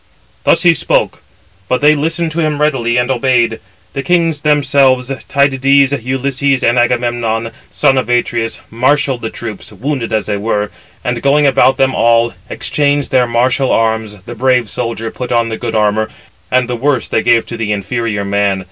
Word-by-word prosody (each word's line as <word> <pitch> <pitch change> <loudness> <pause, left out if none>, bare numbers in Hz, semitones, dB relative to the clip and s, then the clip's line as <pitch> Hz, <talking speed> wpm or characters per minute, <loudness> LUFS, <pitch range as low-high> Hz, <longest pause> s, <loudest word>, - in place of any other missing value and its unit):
Thus - - +3
he 170 -1 +6
spoke; - - 0 0.5
but 125 - +1
they 150 +1 +5
listened 165 +2 -1
to 165 +2 -2
him 155 -2 -1
readily, 130 -6 +1
and 125 +1 +1
obeyed. 120 -3 +1 0.3
The 135 - -3
kings 165 -2 +1
themselves, 140 -3 +2 0.2
Tydides, 140 0 +3
Ulysses, 135 +1 0
and 120 +1 +3
Agamemnon, 120 -2 0 0.2
son 135 -1 +2
of 130 - -4
Atreus, 120 -1 -1
marshalled 130 +2 +1
[the 110 - -3
troops], 110 -3 -7
wounded 120 +3 -4
as 110 -2 0
they 105 -1 -2
were; 105 0 -2 0.3
and, 120 -1 -2
going 145 +2 +3
about 135 -1 +4
among 135 0 +2
them - - -6
all, 115 0 +2 0.2
exchanged 145 -1 -1
their 125 -2 +3
martial 125 +3 +1
arms, 110 -2 0
the 120 - -7
brave 125 -1 +1
[soldier] 115 -1 -3
put 125 -1 -6
on 115 -1 +1
the 110 - -4
good - - -4
[armour], 110 0 +1 0.4
and 130 -1 +1
the 125 - -2
worse 130 +1 0
they - - 0
gave 120 -1 +3
to 120 - -7
the 110 -2 -3
inferior 105 +1 -2
man. 100 -1 0
125 Hz, 175 wpm, -14 LUFS, 115-140 Hz, 0.5 s, he